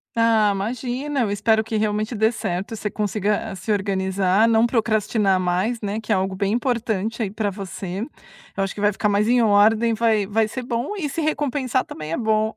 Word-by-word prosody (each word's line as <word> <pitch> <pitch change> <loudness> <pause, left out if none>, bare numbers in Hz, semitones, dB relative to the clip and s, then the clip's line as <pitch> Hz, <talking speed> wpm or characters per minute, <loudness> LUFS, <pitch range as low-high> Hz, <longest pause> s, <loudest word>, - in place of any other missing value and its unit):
Ah, 225 -2 +4
imagina. 250 +7 -2
Eu 215 -4 0
espero 220 +2 +2
que 225 0 -5
realmente 215 +2 -1
dê 220 +1 +3
certo. 200 -1 -4
Você 215 -1 -3
consiga 210 0 -1
a - - -6
se 195 +4 -4
organizar; 190 0 +1
não 225 0 +4
procrastinar 215 -4 +1
mais, 185 +6 0
né, 210 +1 -2
que 220 - -6
é - - +5
algo 190 0 -1
bem 200 +2 0
importante 230 -3 -1
aí 210 - -1
pra 210 0 -2
você. 190 -1 -6 0.6
Eu 195 - 0
acho 195 - -3
que 205 - -7
vai 205 0 +3
ficar 210 +1 0
mais 205 +1 +2
em 245 +1 +4
ordem. 220 +2 +4
Vai 220 -2 +2
vai 220 +2 +1
ser 250 +3 -5
bom 240 - -3
e 310 -7 -2
se 330 - -3
recompensar 280 -4 0
também 155 0 -7
é - - -1
bom. 220 -1 +1
215 Hz, 205 wpm, -22 LUFS, 200-230 Hz, 0.6 s, é